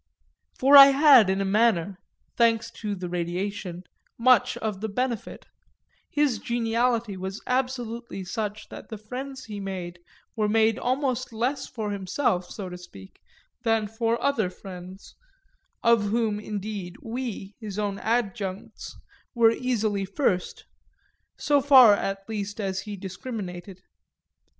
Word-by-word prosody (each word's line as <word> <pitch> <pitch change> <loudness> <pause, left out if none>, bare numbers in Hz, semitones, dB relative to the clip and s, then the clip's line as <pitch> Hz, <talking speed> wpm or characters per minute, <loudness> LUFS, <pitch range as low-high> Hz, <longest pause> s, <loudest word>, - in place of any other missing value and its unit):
For 275 +2 +5
I 275 -1 +12
had 275 -6 +6
in 190 +1 +1
a - - 0
manner, 195 -3 +2 0.4
thanks 230 -1 +2
to 210 -3 -4
the 180 -1 -5
radiation, 180 +1 -4 0.3
much 250 -1 +4
of 210 -3 -4
the 220 - -2
benefit; 240 +2 -3 0.6
his 290 -7 +1
geniality 235 -2 0
was 190 +2 -5
absolutely 245 -5 -3
such 210 +2 -5
that - - -10
the 220 - -6
friends 260 +5 -7
he 210 -2 -7
made 180 -3 -6 0.4
were 215 -2 0
made 220 0 +3
almost 255 -1 -1
less 245 +5 -2
for 215 -4 -4
himself, 190 -1 -1
so 200 -3 -6
to 180 0 -8
speak, 100 - -14 0.4
than 225 -3 +1
for 225 +2 -1
other 225 -10 +1
friends 185 0 -11 0.7
of 230 -3 +4
whom 220 -1 0
indeed 205 -3 -5
we, 225 -4 -5
his 210 -4 -7
own 205 -2 -2
adjuncts, 205 -4 -3 0.4
were 230 -1 +5
easily 220 -5 -1
first 190 -3 -1 0.7
so 290 -1 +2
far 260 -6 +8
at 195 -1 -3
least 205 -1 -5
as 190 -2 -2
he 210 -2 -7
discriminated. 190 -2 -7
215 Hz, 130 wpm, -26 LUFS, 195-235 Hz, 0.7 s, I